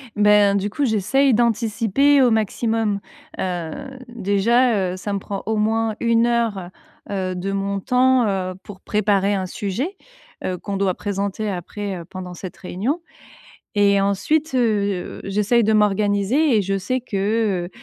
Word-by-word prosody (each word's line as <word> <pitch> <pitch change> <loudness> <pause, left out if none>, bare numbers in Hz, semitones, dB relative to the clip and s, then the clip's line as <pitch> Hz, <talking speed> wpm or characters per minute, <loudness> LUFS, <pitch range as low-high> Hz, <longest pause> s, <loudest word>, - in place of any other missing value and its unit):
Ben, 210 -1 +5
du 200 +1 -1
coup, 285 +6 -1
j'essaye 235 +5 +2
d'anticiper 235 +4 +2
au 250 - +5
maximum. 220 -1 0 0.4
Heu, 175 -4 -2 0.4
déjà, 210 -1 +2
heu, - - -4
ça 205 +2 -5
me 200 - 0
prend 195 0 -5
au 220 -1 0
moins 220 0 +1
1 230 0 +3
heure, 225 -7 0 0.4
heu, 190 -2 -2
de 185 +2 -3
mon 195 0 -2
temps, 250 +1 +3
heu, 185 -2 -1
pour 195 -2 -11
préparer 205 -1 +1
un 190 -2 -1
sujet, 245 - -3 0.5
heu, 180 -2 -2
qu'on 200 -1 -4
doit 195 -2 +1
présenter 200 +2 -3
après 195 +1 -5
pendant 180 -1 -7
cette 185 +1 -8
réunion 230 - -3 0.8
et 200 -1 +4
ensuite, 270 +10 0
heu, 205 -6 0
j'essaye 210 +4 +2
de 220 - +2
m'organiser 210 +6 +2
et 205 - +3
je 195 +1 -1
sais 255 +7 -2
que, 205 -4 -1
heu - - -9
205 Hz, 150 wpm, -21 LUFS, 195-230 Hz, 0.8 s, Ben